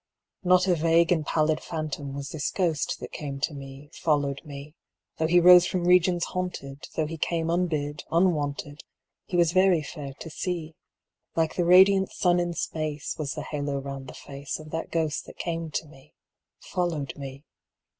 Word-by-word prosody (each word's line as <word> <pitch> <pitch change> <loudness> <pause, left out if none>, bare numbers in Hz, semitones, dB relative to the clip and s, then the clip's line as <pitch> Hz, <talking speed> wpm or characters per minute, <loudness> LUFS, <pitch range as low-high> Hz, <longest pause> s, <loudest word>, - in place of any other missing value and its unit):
Not 180 0 +5
a 180 - +4
vague 165 +1 +3
and 165 -3 +3
pallid 155 +1 +1
phantom 155 -4 -4
Was 140 0 -5
this 150 -1 -2
ghost 170 -6 0
that - - -7
came 140 -2 -5
to 150 - 0
me, 140 +1 -10
followed 145 -3 0
me: 145 -1 -9 0.5
Though 160 - +2
he 175 +2 +5
rose 180 0 +8
from 180 -2 -1
regions 180 -1 +4
haunted, 155 -6 -5
Though 160 - +1
he 160 +1 -6
came 165 0 0
unbid, 155 -4 -1
unwanted, 150 -4 0 0.5
He 180 - -1
was 170 -2 +4
very 185 -3 +4
fair 140 -3 -7
to 165 - -9
see. 165 -2 -3 0.6
Like 160 -1 +1
the 175 - +1
radiant 190 +2 +6
sun 175 -1 +2
in 175 -1 -1
space 155 -3 -3
Was 145 -3 -2
the 150 - -5
halo 145 -2 -3
round 135 -1 -6
the - - -9
face 140 0 -6
Of 155 0 -11
that 165 0 -3
ghost 160 -3 -1
that - - -12
came 165 -1 -3
to 155 - -3
me, 145 -1 -18 0.5
followed 170 -6 -2
me. 135 0 -8
160 Hz, 175 wpm, -26 LUFS, 145-175 Hz, 0.6 s, rose